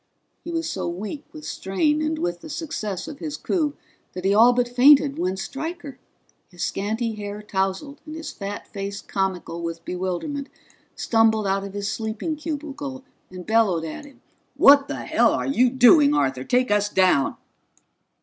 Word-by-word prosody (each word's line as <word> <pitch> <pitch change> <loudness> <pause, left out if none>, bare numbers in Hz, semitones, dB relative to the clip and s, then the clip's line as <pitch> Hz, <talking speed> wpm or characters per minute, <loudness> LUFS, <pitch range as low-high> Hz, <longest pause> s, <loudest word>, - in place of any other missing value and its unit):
He - - -7
was 330 -1 -2
so 190 - -3
weak 210 - -5
with 310 -1 -10
strain 295 +11 0
and 310 +1 -1
with 175 - -3
the - - -10
success 215 - -4
of 290 -2 -8
his 305 -2 -5
coup 300 -5 -1 0.4
that 185 0 -6
he 195 - +4
all 230 +4 +7
but 245 0 +1
fainted 275 +3 +5
when 185 +1 -1
Stryker, 290 - -6 0.5
his 175 -2 -6
scanty 220 +3 -2
hair 205 0 -6
tousled 195 +8 -2
and 310 - -7
his 320 -2 -6
fat 200 +1 -6
face 200 0 -5
comical 185 -3 -3
with 165 0 -5
bewilderment, 185 - -3 0.5
stumbled 225 -2 +2
out 195 0 0
of 200 -1 -7
his 200 0 -3
sleeping 220 +8 -3
cubicle 290 -3 -6 0.3
and 180 -1 -9
bellowed 215 -7 +2
at 160 - -7
him. 285 -2 -17 0.3
"What 280 0 +7
the - - -5
hell - - +3
are - - -1
you 255 -2 +3
doing, 280 +4 +6
Arthur? 130 - 0
Take 250 -2 +1
us 205 0 +2
down!" 185 -9 +2
225 Hz, 170 wpm, -23 LUFS, 195-290 Hz, 0.5 s, all